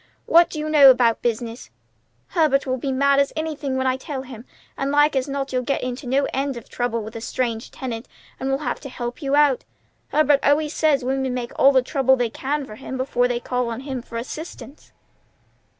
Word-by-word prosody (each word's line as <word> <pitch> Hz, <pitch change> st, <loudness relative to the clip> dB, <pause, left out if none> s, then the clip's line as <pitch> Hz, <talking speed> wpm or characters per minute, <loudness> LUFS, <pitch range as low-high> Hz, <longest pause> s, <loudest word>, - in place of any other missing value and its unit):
What 340 Hz, +1 st, +5 dB
do -, -, -7 dB
you 305 Hz, 0 st, -3 dB
know 295 Hz, -3 st, +8 dB
about 245 Hz, -3 st, +4 dB
business? 235 Hz, -, -3 dB, 0.6 s
Herbert 300 Hz, -5 st, +2 dB
will 260 Hz, -1 st, -1 dB
be 270 Hz, +2 st, -2 dB
mad 280 Hz, +1 st, +3 dB
as 280 Hz, -, +2 dB
anything 305 Hz, -4 st, -3 dB
when 260 Hz, -, -1 dB
I 260 Hz, 0 st, +1 dB
tell 265 Hz, -1 st, -6 dB
him; 245 Hz, -3 st, -11 dB, 0.3 s
and 275 Hz, -, -2 dB
like 295 Hz, +1 st, +4 dB
as 265 Hz, +1 st, 0 dB
not 275 Hz, -1 st, -3 dB
you'll 255 Hz, -, +1 dB
get 275 Hz, +3 st, -2 dB
into 250 Hz, +1 st, -5 dB
no 270 Hz, +3 st, +2 dB
end 270 Hz, -1 st, -1 dB
of 235 Hz, -, -10 dB
trouble 235 Hz, -2 st, -2 dB
with 220 Hz, +2 st, -9 dB
a 230 Hz, -, -5 dB
strange 235 Hz, -1 st, -2 dB
tenant, 235 Hz, -3 st, -6 dB, 0.3 s
and 265 Hz, -, -2 dB
we'll 270 Hz, -, +1 dB
have -, -, -2 dB
to 275 Hz, -, -8 dB
help 245 Hz, +2 st, -6 dB
you 275 Hz, -1 st, 0 dB
out. 290 Hz, -3 st, +3 dB, 0.4 s
Herbert 295 Hz, -2 st, +3 dB
always 295 Hz, +2 st, +2 dB
says 285 Hz, -5 st, +2 dB
women 265 Hz, -1 st, -1 dB
make 240 Hz, -1 st, -4 dB
all 275 Hz, -, +6 dB
the 260 Hz, -2 st, +3 dB
trouble 265 Hz, -1 st, +2 dB
they 245 Hz, -3 st, -1 dB
can 285 Hz, +3 st, -2 dB
for 215 Hz, -4 st, -11 dB
him 260 Hz, 0 st, -6 dB
before 245 Hz, -1 st, +1 dB
they 245 Hz, -1 st, -1 dB
call 250 Hz, 0 st, -2 dB
on 230 Hz, +2 st, -5 dB
him 265 Hz, -2 st, -5 dB
for 230 Hz, -, -8 dB
assistance." 290 Hz, +3 st, -8 dB
265 Hz, 215 wpm, -22 LUFS, 245-280 Hz, 0.6 s, know